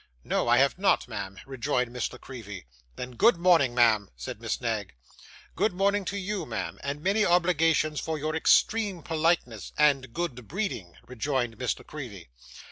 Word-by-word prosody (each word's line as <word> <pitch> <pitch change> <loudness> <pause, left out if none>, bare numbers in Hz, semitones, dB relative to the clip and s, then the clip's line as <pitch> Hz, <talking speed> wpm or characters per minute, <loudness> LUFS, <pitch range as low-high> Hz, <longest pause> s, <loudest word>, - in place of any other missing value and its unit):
'No, - - 0
I 120 +1 +5
have 140 +6 +3
not, 195 - +2
ma'am,' 100 -4 -6
rejoined 130 -2 -1
Miss 125 -1 -3
La - - -10
Creevy. 105 - -9 0.3
'Then 125 0 -6
good 205 - +4
morning, 170 -8 +4
ma'am,' 110 -5 +4
said - - -7
Miss - - -2
Knag. - - -3 0.6
'Good 200 +2 +1
morning 200 +2 +1
to 200 - -3
you, 200 -1 -3
ma'am; - - -4
and 145 +2 -4
many 205 +3 +2
obligations 165 -4 +2
for 160 -1 -3
your 155 +2 -2
extreme 200 +1 +2
politeness 160 - 0
and 140 -4 +3
good 125 -8 -4
breeding,' 155 - -4
rejoined 125 -2 -2
Miss 125 - -1
La - - -13
Creevy. 105 - -9
145 Hz, 165 wpm, -27 LUFS, 120-175 Hz, 0.6 s, I